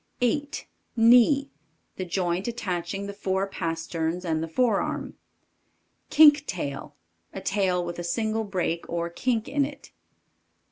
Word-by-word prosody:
8. 285 +5 -1 0.3
KNEE. 250 +5 +5 0.5
The 185 - -3
joint 180 +2 -1
attaching 195 -4 -3
the 200 - -6
fore 195 -1 -1
pasterns 165 0 -3
and 160 -2 0
the 165 - -3
forearm. 215 +5 0 1.0
Kink 295 -2 +7
tail. 140 -6 -5 0.4
A - - -5
tail 190 -2 0
with 175 0 -5
a - - -3
single 220 +5 -1
break 180 -4 -2
or 170 0 -2
kink 230 +4 -1
in 285 0 +1
it. 285 0 -7
195 Hz, 130 wpm, -26 LUFS, 170-240 Hz, 1.0 s, Kink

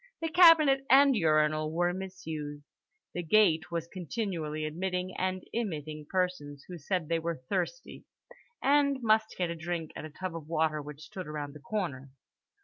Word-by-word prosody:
The 325 - -2
cabinet 315 -6 +7
and 275 0 +7
urinal 155 -3 +2
were 175 +2 +1
misused. 160 -6 -6 0.5
The 175 - -2
gate 175 -2 +3
was 170 -1 -2
continually 170 -4 -4
admitting 180 +3 -3
and 185 0 -2
emitting 155 -9 -4
persons 180 -7 -2
who 180 -2 -8
said 170 +1 -2
they 165 +1 +1
were 165 -5 -4
thirsty, - - -3 0.6
and 280 0 +4
must 220 0 +2
get 175 -2 0
a - - -4
drink 165 -1 -4
at - - -6
a - - -7
tub 180 +3 -6
of 160 -3 -7
water 155 -2 0
which 150 0 -10
stood 185 -3 -8
around 150 -2 -5
the 150 - -11
corner. 150 -6 -4
170 Hz, 160 wpm, -30 LUFS, 155-190 Hz, 0.6 s, cabinet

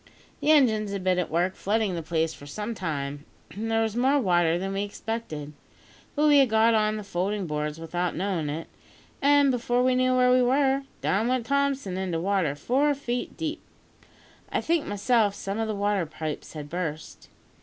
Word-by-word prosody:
The - - -1
engines 220 -9 +4
had 195 -2 -4
been 185 -1 +2
at 180 - -2
work 175 +3 +1
flooding 210 -1 0
the 170 - -3
place 160 0 -1
for 145 - -12
some 210 +9 -4
time, 145 -7 -4 0.3
and 220 +3 -4
there 225 0 +2
was 220 -1 -2
more 265 +4 +3
water 175 -6 +2
than 195 +2 -3
we 195 - -1
expected; 205 -8 -5 0.6
but 300 0 +2
we 290 -1 +6
had 270 -3 +4
got 220 +1 +4
on 215 -1 +2
the 210 - -6
folding 195 +1 -2
boards 150 0 -3
without 175 +2 -2
knowing 180 -4 -1
it, 155 +3 -5 0.5
an' 285 -1 +5
before 245 0 +1
we 255 0 +3
knew 255 0 +2
where 250 0 +4
we 255 0 +5
were, 270 +2 +2 0.2
down 210 +4 +1
went 250 -2 0
Thompson 275 -8 0
into 185 -3 -2
water 180 -5 0
four 275 - +1
feet 245 -3 -4
deep. 320 -1 -3 0.9
I - - +1
think 330 -2 0
myself 205 0 +2
some 200 +1 -4
of 225 - -1
the 215 - -2
water 200 -3 0
pipes 155 -1 -6
had 150 -2 -7
burst. 160 -2 -5
205 Hz, 190 wpm, -26 LUFS, 175-250 Hz, 0.9 s, we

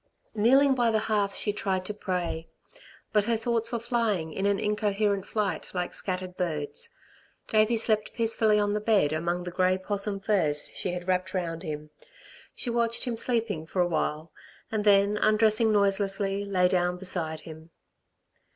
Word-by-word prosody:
Kneeling 265 +6 +4
by 240 -3 +1
the 220 - +2
hearth 210 -2 0
she 205 - +1
tried 190 -3 -2
to 210 - -3
pray. 180 -5 -4 0.7
But 210 -1 +3
her 230 0 +1
thoughts 230 0 -1
were 235 - -1
flying 225 -9 -1
in 195 +4 -1
an 200 -1 +1
incoherent 210 -1 -1
flight 210 -3 -2
like 180 0 -2
scattered 185 -1 -2
birds. 170 - -2 0.6
Davey 215 +2 +2
slept 215 -1 +3
peacefully 225 -2 +3
on 205 0 +1
the 210 - -1
bed 205 -9 +2
among 170 +3 -2
the 180 - -6
grey 185 +1 +1
'possum 200 +1 -1
furs 170 -8 +1
she 180 - -3
had 180 0 -6
wrapped 185 +1 -1
round 165 -3 -3
him. 150 -2 -6 0.6
She 245 - -2
watched 235 0 0
him 245 -3 -2
sleeping 225 -9 -1
for 185 - -4
awhile, 165 -2 -1 0.4
and 215 -1 -2
then 200 0 +4
undressing 215 +1 +4
noiselessly, 200 -1 0
lay 185 -2 +2
down 180 -1 0
beside 165 -4 0
him. 160 0 -12
200 Hz, 160 wpm, -27 LUFS, 180-215 Hz, 0.7 s, Kneeling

